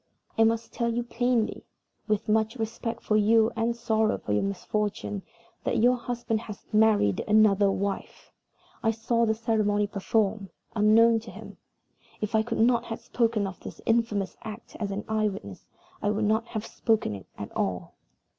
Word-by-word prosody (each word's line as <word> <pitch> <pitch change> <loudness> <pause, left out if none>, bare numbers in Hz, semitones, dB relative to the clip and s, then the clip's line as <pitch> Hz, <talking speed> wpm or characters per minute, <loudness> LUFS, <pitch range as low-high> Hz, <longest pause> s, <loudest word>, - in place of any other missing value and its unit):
I 225 - +4
must 225 0 0
tell 235 -1 0
you 240 +1 -1
plainly, 240 -1 0 0.4
with 215 -2 0
much 220 +1 +2
respect 230 0 -4
for 215 - +1
you 220 +1 +4
and 230 +1 0
sorrow 220 -2 +1
for 105 - -3
your 105 - +2
misfortune, 200 +1 -2 0.4
that - - 0
your 245 +3 +5
husband 240 -2 -2
has 210 -3 -9
married 210 - +3
another 210 -2 +5
wife. 200 0 -4 0.5
I 225 - +2
saw 230 +1 +1
the 220 - +2
ceremony 215 -2 +1
performed, 205 0 0 0.3
unknown 225 +2 +5
to 225 +1 -11
him. - - -11 0.6
If 210 +1 -3
I 220 - +4
could 230 +1 -3
not 235 +1 +3
have 225 - -5
spoken 230 -3 0
of 190 -2 -6
this - - -9
infamous 225 -4 +1
act 220 0 -9
as 205 -2 -2
an 200 +1 -4
eye 215 -1 +1
witness, 100 - -9 0.3
I 205 - +1
would 210 +1 0
not 220 +2 +1
have 215 -1 -4
spoken 220 - 0
of 100 - -7
it - - -20
at 100 - -7
all. 90 -3 -2
220 Hz, 175 wpm, -27 LUFS, 205-230 Hz, 0.6 s, your